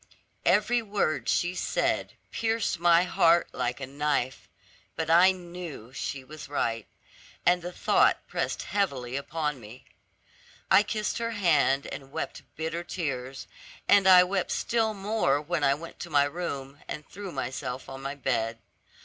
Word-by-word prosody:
Every 245 -1 +3
word 200 -7 -1
she 175 +1 +1
said - - -1 0.2
pierced 225 -5 0
my 170 0 +5
heart 170 -1 +3
like 125 +1 -2
a 135 - -4
knife; 140 -1 -2 0.5
but 160 0 -1
I 175 +3 +7
knew 175 -9 -8
she 135 -1 -4
was 150 +2 -10
right, 115 -6 -1 0.6
and 180 0 +4
the 175 +1 -5
thought - - +3
pressed - - -2
heavily 135 -11 -1
upon 150 0 -2
me. 115 +4 -12 0.9
I - - +8
kissed 210 +1 -2
her 230 0 -1
hand, 150 -7 +3
and 135 -1 -8
wept - - -4
bitter 160 +2 -3
tears, 135 -7 -4 0.4
and 200 -1 +6
I 180 -1 +9
wept 185 0 -1
still 225 -2 0
more 200 -8 +1
when 155 +1 -2
I 140 0 +4
went 165 +3 -10
to 175 - -6
my 145 -2 +4
room, 145 -3 -4
and 150 - -6
threw 200 -1 -8
myself 130 -1 -4
on 135 0 -8
the 135 +1 -4
bed. 115 -5 -1
160 Hz, 150 wpm, -28 LUFS, 135-180 Hz, 0.9 s, I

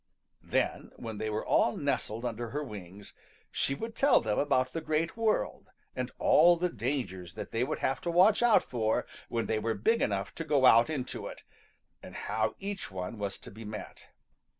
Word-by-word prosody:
Then, - - -1
when 110 -2 -7
they 110 - -2
were 110 0 -2
all 120 - +3
nestled 125 -5 -2
under 120 0 -3
her 150 +5 -3
wings, 100 -5 -9 0.4
she 135 - 0
would 225 +8 -5
tell 280 +1 +5
them 110 -2 -1
about 130 -3 +1
the 165 - -2
Great 155 +2 -1
World 225 -2 0 0.3
and - - -2
all 175 0 +6
the 180 +1 0
dangers 105 - -3
that - - -6
they 115 +2 0
would 140 - -2
have 135 - -1
to 175 - -3
watch 185 +6 +5
out 240 -2 +5
for 115 0 0 0.2
when 115 -1 -1
they 110 - 0
were 110 +1 -1
big 225 - +2
enough 100 -1 -1
to 165 - -5
go 145 -4 +3
out 115 +2 +7
into 140 -5 -4
it, - - -10 0.6
and - - -11
how 110 0 -1
each 200 0 -5
one 95 +3 -5
was 100 -1 -3
to - - -12
be 110 +3 -10
met. 105 0 -8
120 Hz, 195 wpm, -30 LUFS, 110-160 Hz, 0.6 s, out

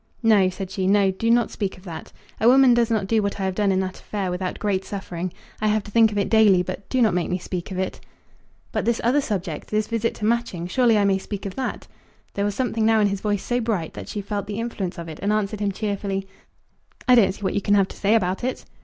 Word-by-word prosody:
"No," 210 -4 +5
said 190 0 -6
she; 190 -1 -1
"no. 200 -1 +4
Do 225 +5 -2
not 235 0 +3
speak 200 -3 -3
of 185 - -16
that. 170 -4 -8 0.3
A 220 - +3
woman 260 0 +7
does 235 -1 +2
not 220 -4 +1
do 220 +2 +2
what 200 0 -2
I - - -2
have 190 0 0
done 200 0 +1
in 190 0 +2
that 185 -1 -5
affair 195 -3 -3
without 180 0 -3
great 195 -3 -1
suffering. 185 -3 -5 0.3
I 215 - +2
have 215 0 +1
to 205 - -11
think 225 0 +5
of 205 - -4
it 200 - +1
daily; 210 -5 +5
but 185 +2 -7
do 255 -2 +2
not 215 - +3
make 180 -1 0
me 180 - 0
speak 180 -1 -5
of 190 - -5
it." 190 0 -3 0.7
"But - - -1
this 235 0 +1
other 255 +5 +3
subject, 185 - -4
this 215 0 +1
visit 230 0 -1
to 210 - -4
Matching; 230 -7 0
surely 230 +4 +3
I 205 - +3
may 195 -1 +2
speak 200 +1 -6
of 195 - -4
that?" 260 +3 -4 0.5
There 200 - -1
was 205 -1 -1
something 230 -3 -1
now 220 0 +4
in 205 -1 +3
his 200 -1 -3
voice 205 -2 -1
so 245 0 0
bright, 210 -8 -2
that - - -8
she 210 - -3
felt 200 0 -4
the 210 +1 -4
influence 220 -6 -4
of 170 -1 -6
it, 155 -2 -8
and 200 +2 +1
answered 215 0 -1
him 205 -1 0
cheerfully, 195 -1 -3 0.8
"I 250 - +6
don't 200 -6 +5
see 210 - -14
what 190 - 0
you 200 - 0
can 205 +1 +2
have 195 -2 +3
to - - -10
say 205 +3 +2
about 185 -2 0
it." 255 +1 -3
205 Hz, 270 wpm, -23 LUFS, 190-225 Hz, 0.8 s, woman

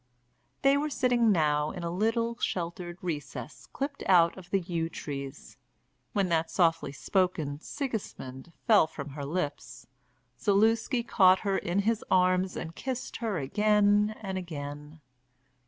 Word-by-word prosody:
They 275 +1 +5
were 300 +1 -1
sitting 245 -5 +3
now 150 -4 +2
in 175 0 -6
a 170 - -2
little 225 +5 0
sheltered 175 0 -3
recess 155 -5 -5
clipped 280 +1 -4
out 170 -3 +5
of 190 -2 -12
the 195 - +2
yew 170 -2 -2
trees. 140 -3 -7 0.6
When 200 -3 +2
that 165 -1 +1
softly 165 -5 +2
spoken 155 -2 -1
"Sigismund" 170 - -5
fell 210 -8 +6
from 145 -2 -7
her 145 +1 -7
lips, 145 0 -4 0.6
Zaluski 225 - +2
caught 190 -5 +5
her 200 -2 0
in 185 +1 0
his 225 +1 0
arms 185 0 +3
and 165 0 -5
kissed 260 +6 -4
her 220 -5 -2
again 210 +7 +3
and 190 -1 -3
again. 150 -2 -7
185 Hz, 140 wpm, -29 LUFS, 160-215 Hz, 0.6 s, fell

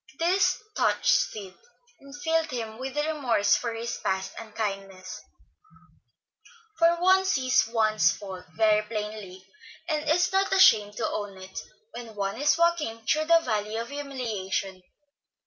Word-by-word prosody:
This 360 +4 +2 0.2
touched - - +1
Sid, 200 - -1 0.5
and 280 +1 -12
filled 325 -1 +1
him 225 -4 -5
with 265 +2 -5
remorse 295 -9 +2
for 230 -2 -3 0.2
past 190 0 -1
unkindness; 195 -4 -5 1.6
for 335 0 +4
one 375 +2 +4
sees 255 -10 +2
one's 220 -2 +2
faults 190 -3 -8
very 215 -1 +4
plainly, 210 -3 -6 0.4
and 305 -2 -1
is 355 +3 +3
not 385 0 +1
ashamed 210 - +5
to - - -1
own 205 -2 -5
it, 190 0 -8 0.3
when 230 -3 -9
one 200 +4 -3
is 295 +2 +3
walking 315 -10 0
through 310 +5 +1
the 335 +1 +5
Valley 215 -5 -2
of 230 +1 -4
Humiliation. 225 -10 -4
225 Hz, 130 wpm, -26 LUFS, 205-305 Hz, 1.6 s, ashamed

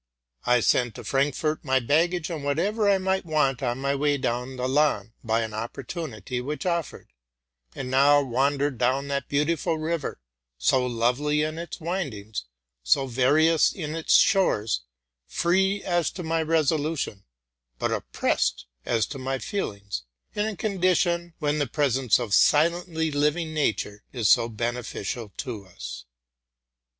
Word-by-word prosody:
I 125 -1 +4
sent 120 -1 +2
to - - -8
Frankfort 145 +3 0
my 130 -2 +2
baggage, 165 +7 +1
and 155 -4 -4
whatever 200 +9 +1
I 200 - +5
might 190 0 0
want 150 -6 +1
on 120 -2 -1
my 140 +1 0
way 145 +1 +1
down 125 +1 -2
the 125 0 -2
Lahn, 130 -6 +1
by 115 0 +1
an 110 -1 -4
opportunity 125 - -5
which 150 +7 -4
offered, 170 -3 -3 0.6
and 130 -1 -5
now 140 +2 +6
wandered 140 0 0
down 135 +3 +1
that 140 -2 -2
beautiful 160 +3 0
river, 160 - -3 0.4
so 65 - +2
lovely 125 +5 +1
in 155 +1 -3
its 170 - -7
windings, 125 - -4 0.4
so 65 - +3
various 145 +6 +3
in 155 -4 -5
its 165 - +2
shores, 115 - +3 0.5
free 190 +3 +1
as 175 -4 +1
to 180 - -6
my 165 0 0
resolution, 155 - 0 0.5
but - - -1
oppressed 60 - -1 0.2
as 115 -2 +2
to 135 - -7
my 135 +1 -2
feelings, 100 - -4 0.2
— - - -48
in 210 +1 0
a 220 - -3
condition 175 -4 +1
when 150 -1 0
the 145 - +1
presence 135 -4 +2
of 120 -5 -3
silently 160 +2 +3
living 150 +3 0
nature 110 -8 -1
is 120 -5 0
so 115 0 +5
beneficial 115 -1 -4
to 110 -7 -5
us. 65 -4 -8
140 Hz, 145 wpm, -25 LUFS, 120-165 Hz, 0.6 s, now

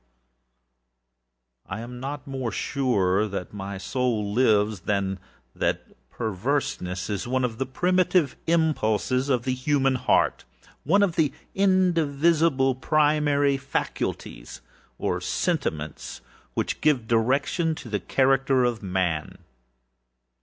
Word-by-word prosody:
Yet 95 - -4
I - - -6
am 125 +1 -8
not 140 +2 -5
more 130 -4 -3
sure 105 -6 +1
that 100 -2 -6
my 100 -1 -5
soul 110 -1 -1
lives, 105 -4 +3
than 100 +3 0
I 95 - -2
am 95 - -6 0.4
that - - -3
perverseness 95 -5 -2
is 105 +2 -3
one 130 +1 0
of 115 -1 -5
the 135 - -1
primitive 180 0 +2
impulses 135 -5 +1
of 125 -3 +1
the 130 - 0
human 135 0 +1
heartâone 195 - 0
of 180 -4 0
the 150 -4 +3 0.2
indivisible 165 -6 +2
primary 145 0 +2
faculties, 65 - -4 0.4
or - - -1
sentiments, 75 -1 -2 0.3
which - - -2
give 135 -7 +2
direction 140 +8 +1
to 140 - -9
the 105 -2 -2
character 135 +1 +2
of 120 -2 0
Man. 90 -5 -2
130 Hz, 115 wpm, -25 LUFS, 105-145 Hz, 0.4 s, lives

